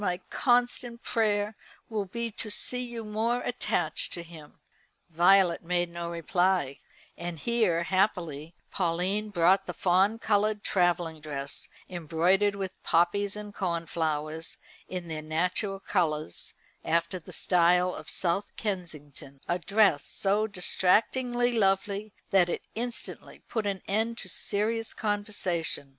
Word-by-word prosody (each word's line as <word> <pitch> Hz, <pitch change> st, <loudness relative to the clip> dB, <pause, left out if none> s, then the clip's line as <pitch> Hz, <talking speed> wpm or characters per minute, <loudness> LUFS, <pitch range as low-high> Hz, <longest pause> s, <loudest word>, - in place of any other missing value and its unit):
my 180 Hz, -3 st, 0 dB
constant 245 Hz, -1 st, +1 dB
prayer 210 Hz, -2 st, +1 dB, 0.3 s
will 215 Hz, -3 st, -2 dB
be 235 Hz, +4 st, -4 dB
to 215 Hz, +1 st, -4 dB
see 250 Hz, +4 st, +2 dB
you 235 Hz, -2 st, -6 dB
more 225 Hz, +3 st, 0 dB
attached 175 Hz, -9 st, -1 dB
to 170 Hz, -, -5 dB
him." 160 Hz, -3 st, -13 dB, 0.6 s
Violet 175 Hz, +1 st, +4 dB
made 175 Hz, 0 st, 0 dB
no 170 Hz, 0 st, -4 dB
reply, 170 Hz, -3 st, +1 dB, 0.4 s
and 170 Hz, -1 st, -5 dB
here 205 Hz, -3 st, +1 dB
happily 170 Hz, -4 st, 0 dB, 0.2 s
Pauline 185 Hz, +4 st, 0 dB
brought 190 Hz, 0 st, +3 dB
the -, -, -5 dB
fawn 190 Hz, +4 st, +3 dB
coloured 210 Hz, -1 st, +1 dB
travelling 175 Hz, -4 st, +1 dB
dress, 140 Hz, -2 st, -5 dB, 0.2 s
embroidered 180 Hz, +4 st, +1 dB
with 190 Hz, -2 st, -5 dB
poppies 195 Hz, +4 st, +2 dB
and 210 Hz, -1 st, -7 dB
cornflowers 160 Hz, -3 st, -2 dB, 0.3 s
in 180 Hz, -2 st, -5 dB
their 155 Hz, -1 st, -4 dB
natural 180 Hz, +5 st, -1 dB
colours, 155 Hz, -, -2 dB, 0.3 s
after 170 Hz, +3 st, 0 dB
the 160 Hz, -, -13 dB
style 180 Hz, 0 st, +3 dB
of -, -, -8 dB
South 185 Hz, +3 st, +1 dB
Kensington, 150 Hz, -, -6 dB
a 175 Hz, -, 0 dB
dress 195 Hz, -5 st, +3 dB
so 205 Hz, +2 st, +1 dB
distractingly 240 Hz, +6 st, +2 dB
lovely 200 Hz, 0 st, +1 dB, 0.2 s
that 185 Hz, -3 st, +5 dB
it -, -, -3 dB
instantly 235 Hz, +1 st, -5 dB
put 220 Hz, -3 st, -2 dB
an 195 Hz, -2 st, -3 dB
end 220 Hz, +3 st, 0 dB
to -, -, -7 dB
serious 220 Hz, +2 st, -1 dB
conversation. 205 Hz, -8 st, -2 dB
185 Hz, 125 wpm, -28 LUFS, 170-210 Hz, 0.6 s, that